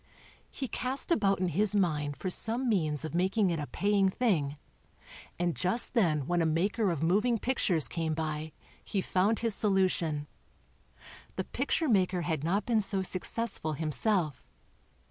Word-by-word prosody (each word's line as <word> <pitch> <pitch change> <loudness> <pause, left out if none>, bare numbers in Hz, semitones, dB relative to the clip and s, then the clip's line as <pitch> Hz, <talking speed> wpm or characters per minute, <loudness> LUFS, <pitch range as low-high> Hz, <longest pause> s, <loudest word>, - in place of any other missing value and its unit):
He 265 - -5
cast 255 +7 -3
about 195 - +2
in 185 -1 0
his 205 +5 +1
mind 150 -7 0
for 185 - -4
some 235 +7 +2
means 160 - 0
of 155 - -6
making 190 +2 +1
it 165 - -2
a 145 - -4
paying 200 -1 +1
thing, 165 - 0 0.8
and 175 -1 -1
just 185 +7 +1
then 160 - +2
when 175 +3 0
a - - +2
maker 195 +7 +1
of 165 -3 -2
moving 210 +8 +2
pictures 200 - +2
came 160 -2 -2
by 155 0 -3 0.3
he 200 - -2
found 190 +4 +1
his 230 -2 +2
solution. 185 -8 +1 1.1
The - - -2
picture 325 -1 -1
maker 185 -6 +2
had 160 -4 -2
not 190 +6 0
been 225 -3 +2
so 195 -1 -1
successful 190 -2 -2
himself. 160 - -1
185 Hz, 155 wpm, -30 LUFS, 160-210 Hz, 1.1 s, about